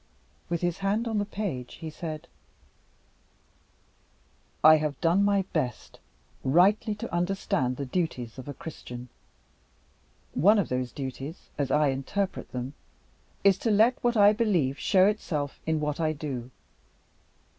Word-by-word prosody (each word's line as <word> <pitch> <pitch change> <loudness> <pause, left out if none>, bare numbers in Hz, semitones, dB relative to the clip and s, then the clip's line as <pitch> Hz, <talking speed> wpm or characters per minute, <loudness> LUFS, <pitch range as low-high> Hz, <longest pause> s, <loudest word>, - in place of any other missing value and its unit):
With 170 -1 -1
his 175 0 -1
hand 205 +4 0
on 220 -2 0
the 205 - 0
page, 190 - -4
he 160 -1 -7
said: 155 0 -6 2.4
"I 155 0 +9
have 150 -1 -2
done 175 +4 +3
my 200 -1 +3
best 130 -7 -3 0.4
rightly 195 - +3
to 205 - -7
understand 175 -8 0
the 140 - -3
duties 130 -6 -3
of 130 - -9
a 145 - -4
Christian. 125 -5 -8 1.2
One 205 +10 +5
of 200 - +1
those 125 -1 -2
duties, 135 +3 -7
as 140 -2 -1
I 150 +1 +3
interpret 160 +9 -3
them, 125 +2 -4 0.7
is 195 -1 +5
to 230 - 0
let 220 +4 +3
what 240 -1 +2
I 205 0 +7
believe 180 - +1
show 190 -2 +4
itself 155 -9 -1
in 160 -1 +1
what 150 0 -2
I 155 -1 +1
do. 135 -5 -5
160 Hz, 140 wpm, -27 LUFS, 135-200 Hz, 2.4 s, I